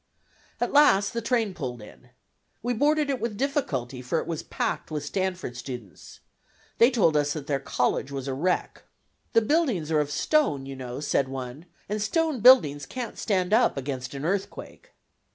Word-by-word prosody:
At - - -1
last 205 -9 +5
the 230 - -2
train 230 -3 0
pulled 130 -8 -5
in. 110 +3 -14 0.5
We 245 +1 0
boarded 295 +4 +2
it 260 - -3
with 225 -3 -3
difficulty, 140 - -2
for 125 +6 -1
it - - -1
was 165 -2 -3
packed - - -3
with 150 -2 -4
Stanford 185 -5 -3
students. 120 -5 -9 0.6
They 235 - +7
told 205 - +2
us 145 -1 +2
that 150 -3 -6
their 140 -1 -1
college 135 +1 -1
was 135 -1 -5
a 135 - -2
wreck. 175 +7 -1 0.5
"The 230 - +5
buildings 235 - +1
are 155 - +3
of 150 -1 0
stone, 145 - +1
you 135 0 -7
know," 125 +1 -6
said 140 -2 +1
one, 135 +4 -7 0.2
"and 210 +1 -2
stone 315 +4 0
buildings 175 - +6
can't 250 -3 -6
stand 190 -2 0
up 230 - +4
against, 130 -1 -4
an 140 +2 -5
earthquake." 200 - -4
165 Hz, 175 wpm, -26 LUFS, -, 0.6 s, They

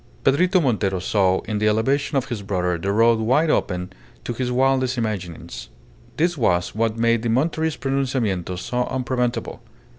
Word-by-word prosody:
Pedrito 180 +7 +3
Montero 105 - 0
saw 95 0 +1
in 105 -2 -3
the 105 - +2
elevation 135 +7 +1
of 135 - 0
his 115 -4 -4
brother 90 -3 -1
the 100 +4 -1
road 115 +2 +4
wide 130 +8 +2
open 90 +1 -1 0.3
to 120 - -3
his 125 +1 -2
wildest 130 0 +1
imaginings. 90 - -5 0.5
This 175 +2 +1
was 90 - +1
what 115 0 0
made 115 0 +2
the 120 - -2
Monterist 160 +6 0
pronunciamiento 125 -10 -1
so 125 +6 -2
unpreventable. 125 -1 -2
115 Hz, 155 wpm, -22 LUFS, 100-135 Hz, 0.5 s, road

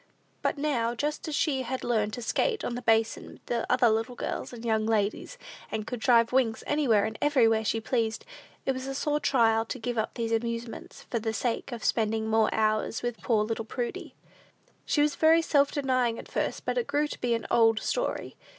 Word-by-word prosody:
But - - 0
now, 245 -6 0
just 295 +5 -3
as 305 - -2
she 275 -4 +1
had 260 +1 -4
learned 215 -3 0
to 245 - -5
skate 440 - 0
on - - -2
the 245 - -4
basin 225 -1 0
with 235 -1 -1
other 250 -1 +4
little 225 +3 0
girls - - -4
and 240 -1 -9
young 220 -1 +1
ladies, 220 - -1 0.3
and 215 -1 -3
could 245 +1 -5
drive 230 0 +4
Wings 245 -4 +1
anywhere 245 -9 +2
and 220 0 -5
everywhere 230 -7 +3
she 225 +1 0
pleased, 225 -1 -1 0.4
it - - +2
was 260 0 -5
a 270 - -4
sore 295 +2 0
trial 225 -6 +3
to 245 - -5
give 240 -1 -3
up 220 - -2
these 230 -2 -2
amusements 230 +1 -4
for 235 - 0
the 220 0 -2
sake 235 +4 -2
of 235 -2 -6
spending 220 -1 0
more 220 0 +3
hours 215 +1 0
with 240 -2 -3
poor 220 -3 +2
little 225 +1 -3
Prudy. 240 +2 -5 0.7
She 290 - +3
was 295 -1 +1
very 325 +1 +4
self 285 -3 +3
denying 255 -5 0
at - - -9
first, - - -2
but - - 0
it 475 - -3
grew 295 +1 +1
to - - -8
be 240 -1 +1
an 230 - -4
"old 225 -1 +4
story." - - -2
235 Hz, 205 wpm, -28 LUFS, 225-265 Hz, 0.7 s, other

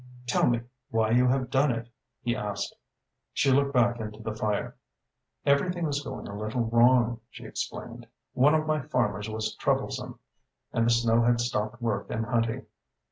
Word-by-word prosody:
"Tell 125 - +2
me 120 -1 +2 0.3
why 110 -3 +1
you 125 +2 +5
have 130 0 +1
done 140 +2 +3
it?" 115 0 -3 0.4
he 120 -2 0
asked. 105 -1 -3 0.6
She 135 - +3
looked 140 +1 +3
back 120 -2 +3
into 105 -1 -6
the 110 -1 -4
fire. 105 -1 -2 0.7
"Everything 170 +5 +2
was 145 -2 -1
going 145 - -6
a 100 - -7
little 110 +4 -2
wrong," 120 0 +4
she - - -11
explained. - - -6 0.3
"One 145 +4 +5
of 155 0 +1
my 155 -1 +1
farmers 110 -7 -1
was 110 0 -2
troublesome, - - -1 0.6
and 115 0 +2
the - - +4
snow 115 0 +4
has 120 0 +3
stopped 110 +1 -2
work 105 -4 -1
and 110 - -2
hunting. 115 -1 0
120 Hz, 170 wpm, -28 LUFS, 110-130 Hz, 0.7 s, you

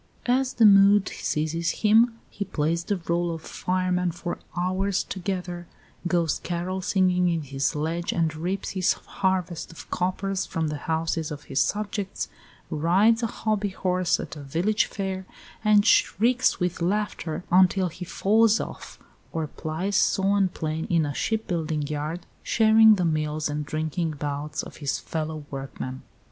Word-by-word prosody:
As 255 +1 +1
the 230 - +4
mood 200 0 +6
seizes 160 +5 -2
him 225 +2 +5
he 205 - -3
plays 165 -1 -1
the 205 - -1
rôle 170 -1 -1
of 160 - -10
fireman 180 -1 -1
for 175 +1 -5 0.2
hours 185 +2 0
together; 180 -2 -4 0.4
goes 170 -3 +1
carol 180 +2 -3
singing 180 -1 +2
in 165 -2 -1
his 135 0 -1
sledge, 165 +3 -2
and 165 -2 0
reaps 180 +5 -3
his 185 -2 +2
harvest 185 -4 -2
of 165 - -11
coppers 185 +1 -1
from 165 -1 -2
the 150 - -3
houses 160 0 0
of 150 -1 -7
his 135 - 0
subjects; 205 -1 -2 0.4
rides 195 +9 +3
a 230 - +1
hobby 215 -2 -1
horse 185 -1 0
at - - -6
a 150 - -8
village 170 +10 +1
fair, 190 -2 -4 0.4
and 210 -1 +5
shrieks 240 +2 +3
with 180 -1 -1
laughter 180 -3 -1
until 185 0 +4
he 180 +2 -8
falls 215 +5 +3
off; - - -7 0.3
or 160 -1 -2
plies 165 +6 -2
saw 195 +1 +3
and 195 -3 +1
plane 155 0 -2
in 165 -3 +3
a 145 - -3
shipbuilding 165 -7 -1
yard, 150 +3 -4 0.2
sharing 220 -1 +6
the 180 -3 0
meals 155 -1 0
and 150 0 -3
drinking 160 +2 -2
bouts 145 0 -4
of - - -10
his 145 -2 -1
fellow 155 -2 -4
workmen. 135 -1 -6
180 Hz, 155 wpm, -25 LUFS, 160-195 Hz, 0.4 s, mood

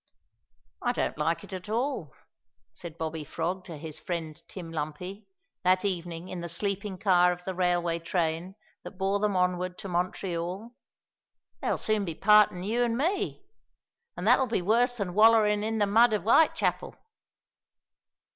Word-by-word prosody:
"I 245 - +1
don't - - -1
like 165 +2 0
it - - -11
at 185 +2 -7
all," 230 - -2 0.6
said 170 -2 -9
Bobby 160 -1 -4
Frog 175 +5 -3
to 165 -4 -8
his 155 0 -7
friend 165 -3 -5
Tim 175 -4 -8
Lumpy, 165 +6 -5 0.4
that 185 +1 +3
evening 175 -2 -3
in 185 -2 -6
the 170 - -5
sleeping 200 +2 -2
car 180 -2 +4
of 180 0 -6
the 190 - -4
railway 175 -2 0
train 170 +2 -2 0.3
that 195 - -10
bore 195 +1 0
them 205 -1 0
onward 180 0 0
to - - -7
Montreal; 180 +3 -3 0.9
"they'll - - 0
soon 215 -1 +1
be 165 -4 -4
partin' 210 -2 +4
you 230 +5 +1
an' 235 -1 0
me, 390 +6 -1 0.7
an' - - -5
that'll 265 - +4
be 220 -6 -1
worse 240 +5 +2
than 195 -5 -3
wallerin' 215 0 +5
in 220 +1 -1
the 210 - +3
mud 225 +3 +4
of 210 - 0
Vitechapel." 270 +9 +2
185 Hz, 155 wpm, -28 LUFS, 170-210 Hz, 0.9 s, wallerin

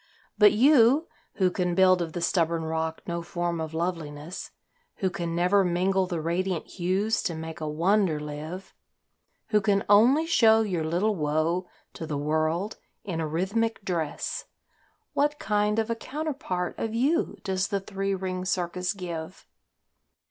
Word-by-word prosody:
But 210 -1 +7
you, 265 +5 +5 0.3
who 185 -2 +2
can 180 -1 -1
build 185 -1 +5
of 165 -2 -3
the 175 - -3
stubborn 170 -1 +1
rock 160 0 -3
no 170 -1 -3
form 175 -1 -2
of 160 -1 -4
loveliness, 165 -1 -4 0.5
Who 190 -2 -1
can 170 -1 -3
never 180 +3 +3
mingle 185 +1 +1
the 175 -3 -2
radiant 170 +2 -1
hues 195 +5 0
to 170 - -2
make 160 +1 -7
a 155 - -2
wonder 170 +1 +2
live, 150 +5 -7 0.8
Who 210 -1 +3
can 200 0 +2
only 240 +10 +5
show 225 -9 +5
your 185 -7 -1
little 180 +7 +1
woe 160 +3 0 0.3
to 160 - -6
the 150 -2 -2
world 155 +7 -1 0.2
in 170 -5 -3
a 160 - -1
rhythmic 200 +7 -1
dress 165 -5 -2 0.7
What 295 +1 +1
kind 210 -2 0
of 225 +1 0
a - - 0
counterpart 260 - -4
of 225 0 -2
you 290 +9 +1
does 190 0 0
the 200 -2 -1
three 195 0 -2
ring 185 -1 -3
circus 180 0 -1
give? 175 -2 -7
185 Hz, 155 wpm, -27 LUFS, 165-205 Hz, 0.8 s, But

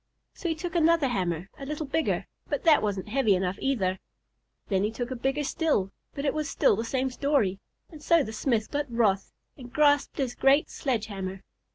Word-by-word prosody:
So 345 - -4
he 325 - 0
took 345 +3 -5
another 330 -4 +3
hammer 180 -5 -1
a 275 - -6
little 300 +1 -3
bigger, 315 +3 0 0.2
but 290 - -2
that 315 -3 +6
wasn't 205 -1 -2
heavy 225 -4 +3
enough 185 +1 -2
either. 190 -9 0 0.7
Then 195 -2 +1
he 210 - +1
took 240 +3 -5
one 255 - -4
bigger 270 +4 0
still, 275 - 0 0.2
but 280 0 -3
it 280 - +2
was 305 -2 -2
still - - +3
the 225 - -2
same 260 +2 -1
story; 250 -9 +1 0.3
and 310 -3 -11
so 335 0 +4
the 220 - -6
smith 220 -1 0
got 290 -1 -2
wroth, 205 -5 +1 0.3
and 250 -3 -11
grasped 290 -1 +3
his 260 -4 -1
great 275 +4 +3
sledge 240 -6 -1
hammer. 195 -2 -6
260 Hz, 200 wpm, -27 LUFS, 205-295 Hz, 0.7 s, that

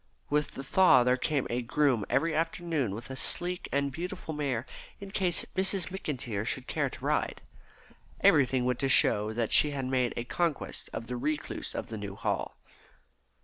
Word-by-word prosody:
With 150 0 0
the 135 - -6
thaw 155 -4 +5
there 125 +1 +3
came 140 +1 -1
a 120 +1 0
groom 125 -3 +1
every 150 +6 +1
afternoon 165 - -1
with 115 +4 -8
a - - -5
sleek 180 +6 -1
and 140 0 0
beautiful 165 +1 -5
mare 140 -5 -2 0.3
in 200 -1 -9
case 180 -3 0
Miss 190 +1 +2
McIntyre 150 - -3
should 125 +3 -4
care - - -1
to - - -9
ride. - - -1 0.8
Everything 130 -3 +4
went 125 -1 0
to 135 - +1
show 105 -3 +4
that 115 0 -1
she 150 - +9
had 140 -2 -3
made 130 -2 0
a 120 - -2
conquest 165 +4 -2
of 115 - -5
the 125 +1 -4
recluse 150 +4 -3
of - - -4
the 110 -1 -5
New 100 -1 -6
Hall. - - -2
135 Hz, 180 wpm, -29 LUFS, 120-165 Hz, 0.8 s, she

